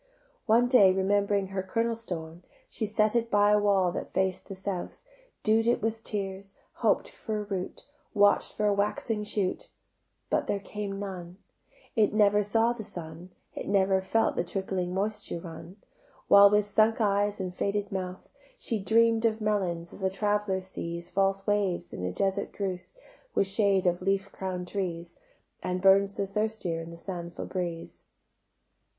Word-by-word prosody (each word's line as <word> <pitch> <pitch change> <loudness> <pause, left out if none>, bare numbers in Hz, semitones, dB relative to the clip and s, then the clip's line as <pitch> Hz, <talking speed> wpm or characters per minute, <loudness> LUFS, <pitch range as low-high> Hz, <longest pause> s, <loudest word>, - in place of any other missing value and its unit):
One 235 +2 +5
day 225 -7 +6
remembering 200 +1 +1
her 195 -1 -2
kernel 230 +5 -1
stone 170 -7 -6 0.3
She 220 - -3
set 215 +1 +1
it 235 -1 +1
by 205 -1 +4
a 210 - +5
wall 195 -3 +3
that - - -5
faced 190 -1 -1
the 195 - -7
south; 190 - -5 0.4
Dew'd 225 +1 +3
it 240 - +3
with 225 0 -2
tears, 195 -1 -4 0.2
hoped - - +2
for 215 -2 -5
a - - -3
root, 195 -3 -5 0.3
Watch'd 205 0 +4
for 210 - -1
a 205 - +4
waxing 210 +2 -1
shoot, 210 - -2 0.6
But - - +1
there - - 0
came 200 0 -5
none; 185 -3 -7 0.6
It 215 -2 +3
never 205 -1 +4
saw 225 +3 +2
the 230 -2 -7
sun, 175 -3 -8 0.2
It - - -6
never 195 -1 +3
felt 195 +4 +1
the - - 0
trickling 185 -1 -3
moisture 205 -2 -2
run: 165 +2 -10 0.5
While 200 0 +9
with 210 0 +3
sunk 215 +2 +2
eyes 205 -1 +1
and 185 -1 -3
faded 200 +2 -2
mouth 185 -1 -5 0.3
She 230 - -2
dream'd 225 +2 +3
of 220 -1 +2
melons, 185 -6 -1
as - - -10
a 190 - +2
traveller 205 0 0
sees 170 -2 -6
False 195 0 +1
waves 200 -4 0
in 90 0 -3
desert 195 0 -1
drouth 185 -3 -4 0.4
With - - +3
shade 195 -1 +2
of 175 0 +1
leaf 195 +1 0
crown'd 185 -2 -4
trees, 175 -3 -4 0.5
And 185 0 -2
burns 195 +1 +4
the 200 - -1
thirstier 200 -4 -2
in 165 - -8
the 170 - -10
sandful 170 -1 -6
breeze. 175 -3 -5
195 Hz, 165 wpm, -28 LUFS, 185-210 Hz, 0.6 s, While